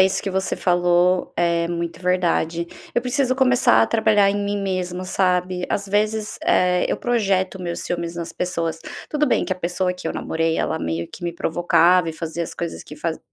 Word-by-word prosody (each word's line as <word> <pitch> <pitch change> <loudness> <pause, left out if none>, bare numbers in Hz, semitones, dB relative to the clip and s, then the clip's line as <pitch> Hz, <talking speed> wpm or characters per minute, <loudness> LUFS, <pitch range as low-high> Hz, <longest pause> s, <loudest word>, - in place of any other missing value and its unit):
isso 190 0 +3
que 200 - -2
você 190 0 -1
falou 175 0 +2
é 170 -1 +1
muito 170 0 -4
verdade. 175 -2 +1 0.3
Eu 240 - +2
preciso 255 0 +1
começar 250 - +4
a 115 - +3
trabalhar 215 -3 +3
em 205 - -1
mim 205 0 -1
mesma, 185 -1 -2
sabe. 180 -1 0
Às 200 0 -2
vezes, 210 +1 0
eh, 180 0 +3
eu - - 0
projeto 195 -6 0
meus 170 -1 -4
ciúmes 170 -1 -3
nas 170 0 -5
pessoas. 165 -3 -2 0.3
Tudo 300 0 +1
bem - - +2
que - - -1
a - - -4
pessoa 180 +1 -1
que 180 - -8
eu - - -1
namorei, 165 0 -1
ela 160 - -1
meio 80 +1 -3
que 175 - -9
me 170 - -2
provocava 175 +1 +3
e 160 - -3
fazia 165 +1 -4
as - - -8
coisas 170 -1 -5
que - - -10
faz 160 +1 -3
180 Hz, 200 wpm, -22 LUFS, 170-195 Hz, 0.3 s, começar